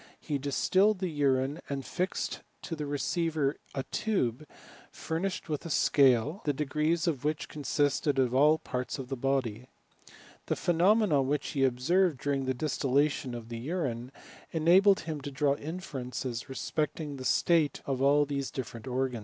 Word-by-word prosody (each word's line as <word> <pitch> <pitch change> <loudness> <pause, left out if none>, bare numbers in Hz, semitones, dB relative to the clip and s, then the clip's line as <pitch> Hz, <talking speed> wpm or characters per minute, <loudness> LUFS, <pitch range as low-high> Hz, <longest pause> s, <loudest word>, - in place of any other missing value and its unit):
He 145 -3 -3
distilled 185 +9 +2
the 185 -2 -2
urine, 140 0 +1
and 135 -2 -3
fixed 185 +1 -2 0.2
to 165 - -4
the 150 -2 -4
receiver 150 0 0 0.2
a 135 - -1
tube 150 - -1 0.4
furnished 170 +4 -3
with 150 -3 -3
a 170 - -6
scale, 140 - +3
the 145 - +1
degrees 150 +4 0
of 150 -7 -1
which 150 0 -1
consisted 145 -1 0
of 125 -2 +2
all 145 +4 +6
the 160 - -4
parts 125 +3 -3
of 130 -2 -7
the 135 - -2
body. 125 -3 -1 0.8
The - - 0
phenomena 175 -2 +3
which 140 +2 -1
be 135 - +1
observed 145 +5 +2
during 140 -1 -1
the 130 0 -1
distillation 140 -1 0
of 115 -1 -8
the 115 -1 -5
urine, 130 -4 -3 0.4
enabled 185 +5 +5
him 155 -2 -5
to 145 - -5
draw 140 +1 +1
inferences 135 -8 -5
respecting 150 +2 -3
the 130 - -7
state 155 +1 +2
of 135 -2 -2
all 145 +2 +4
these 140 -1 -3
difierent 125 -1 -6
organs. 130 -1 -1
145 Hz, 160 wpm, -30 LUFS, 130-160 Hz, 0.8 s, all